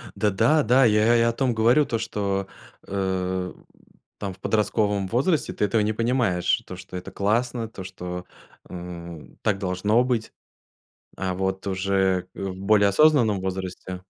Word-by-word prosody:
Да 105 Hz, -, +2 dB
да, 150 Hz, +10 st, +3 dB
да 125 Hz, +4 st, +5 dB
я 105 Hz, -1 st, +4 dB
я 120 Hz, +1 st, +5 dB
и -, -, +3 dB
о 115 Hz, 0 st, +3 dB
том 130 Hz, 0 st, 0 dB
говорю 120 Hz, +6 st, +4 dB
То 115 Hz, -, -1 dB
что, 100 Hz, -1 st, -2 dB, 0.4 s
э, 95 Hz, -1 st, -2 dB
в -, -, -28 dB
там 100 Hz, -2 st, -4 dB
в 90 Hz, -, -19 dB
подростковом 105 Hz, -1 st, 0 dB
возрасте 140 Hz, -, +1 dB
ты -, -, -2 dB
этого 105 Hz, +2 st, +1 dB
не 110 Hz, +1 st, 0 dB
понимаешь, 115 Hz, -6 st, +1 dB
то -, -, -8 dB
что 90 Hz, -, -8 dB
это 90 Hz, -, -8 dB
классно, 115 Hz, +3 st, 0 dB
то 100 Hz, -4 st, -9 dB
что, 90 Hz, -1 st, -7 dB, 0.4 s
м, 85 Hz, -2 st, -9 dB
так 100 Hz, -2 st, +1 dB
должно 100 Hz, +5 st, +1 dB
быть. 120 Hz, -3 st, -2 dB, 0.8 s
А 95 Hz, -1 st, -2 dB
вот 95 Hz, +1 st, -2 dB
уже, 95 Hz, -1 st, 0 dB
э, -, -, -6 dB
в 95 Hz, -1 st, -4 dB
более 100 Hz, 0 st, +4 dB
осознанном 120 Hz, -4 st, +4 dB
возрасте 95 Hz, -1 st, -5 dB
100 Hz, 165 wpm, -24 LUFS, 95-115 Hz, 0.8 s, да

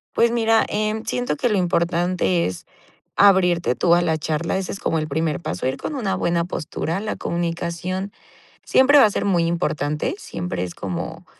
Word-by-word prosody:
Pues 235 Hz, -, +4 dB
mira, 225 Hz, -1 st, +3 dB
em, 215 Hz, +1 st, -1 dB
siento 245 Hz, +3 st, -2 dB
que 255 Hz, -4 st, +1 dB
lo 210 Hz, -, +1 dB
importante 175 Hz, 0 st, +1 dB
es 90 Hz, -, -6 dB, 0.5 s
abrirte 180 Hz, -8 st, +4 dB
tú 170 Hz, +7 st, +4 dB
a 175 Hz, -, +3 dB
la 160 Hz, -2 st, 0 dB
charla. 160 Hz, +4 st, -2 dB
Ese 190 Hz, -, -4 dB
es 195 Hz, -, -7 dB
como 160 Hz, -, 0 dB
el 155 Hz, -, -2 dB
primer 160 Hz, +3 st, -1 dB
paso, 90 Hz, -, -4 dB
ir 130 Hz, -, 0 dB
con 300 Hz, -, -5 dB
una 215 Hz, -8 st, -1 dB
buena 170 Hz, 0 st, 0 dB
postura. 170 Hz, +1 st, -3 dB
La 215 Hz, +1 st, -3 dB
comunicación 175 Hz, +3 st, -3 dB, 0.5 s
siempre 285 Hz, +3 st, +5 dB
va 245 Hz, -, +8 dB
a -, -, 0 dB
ser -, -, -2 dB
muy 175 Hz, -4 st, +2 dB
importante, 150 Hz, -, -1 dB
siempre 90 Hz, -, -5 dB
es 90 Hz, -1 st, -5 dB
como 90 Hz, -4 st, -5 dB
175 Hz, 185 wpm, -22 LUFS, 160-200 Hz, 0.5 s, va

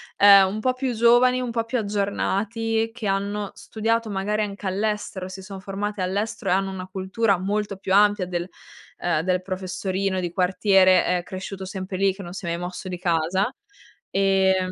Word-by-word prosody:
ehm, 200 Hz, -1 st, +8 dB
un 210 Hz, +3 st, -3 dB
po' 255 Hz, +3 st, +2 dB
più 255 Hz, -1 st, -2 dB
giovani, 240 Hz, +2 st, +4 dB
un 245 Hz, -2 st, -3 dB
po' 230 Hz, -1 st, -1 dB
più 250 Hz, +2 st, -2 dB
aggiornati, 220 Hz, +2 st, -1 dB
che 240 Hz, -2 st, -7 dB
hanno 200 Hz, +1 st, -1 dB
studiato 225 Hz, 0 st, -2 dB
magari 205 Hz, +2 st, -1 dB
anche 200 Hz, -1 st, -5 dB
all'estero, 200 Hz, -1 st, -2 dB
si 190 Hz, +1 st, -8 dB
son 190 Hz, 0 st, -8 dB
formati 200 Hz, +2 st, -4 dB
all'estero 200 Hz, +4 st, -2 dB
e -, -, +5 dB
hanno 195 Hz, 0 st, 0 dB
una 185 Hz, -1 st, -6 dB
cultura 190 Hz, +2 st, 0 dB
molto 205 Hz, +2 st, -2 dB
più 190 Hz, 0 st, -3 dB
ampia 205 Hz, -1 st, +4 dB
del 175 Hz, -1 st, -3 dB, 0.5 s
ehm, 175 Hz, -3 st, +1 dB
del 185 Hz, 0 st, +1 dB
professorino 185 Hz, 0 st, -2 dB
di 175 Hz, -1 st, -3 dB
quartiere, 185 Hz, 0 st, +4 dB
ehm, 180 Hz, -1 st, 0 dB
cresciuto 190 Hz, +1 st, -7 dB
sempre 185 Hz, 0 st, -5 dB
lì 195 Hz, 0 st, +2 dB
che 195 Hz, +1 st, -9 dB
non 175 Hz, -, -8 dB
si 190 Hz, -, -7 dB
è -, -, -4 dB
mai 170 Hz, 0 st, -1 dB
mosso 180 Hz, +2 st, -6 dB
di 180 Hz, -, -4 dB
casa. 180 Hz, +6 st, 0 dB, 0.6 s
Ehm 190 Hz, -1 st, +2 dB
195 Hz, 185 wpm, -24 LUFS, 185-210 Hz, 0.6 s, ehm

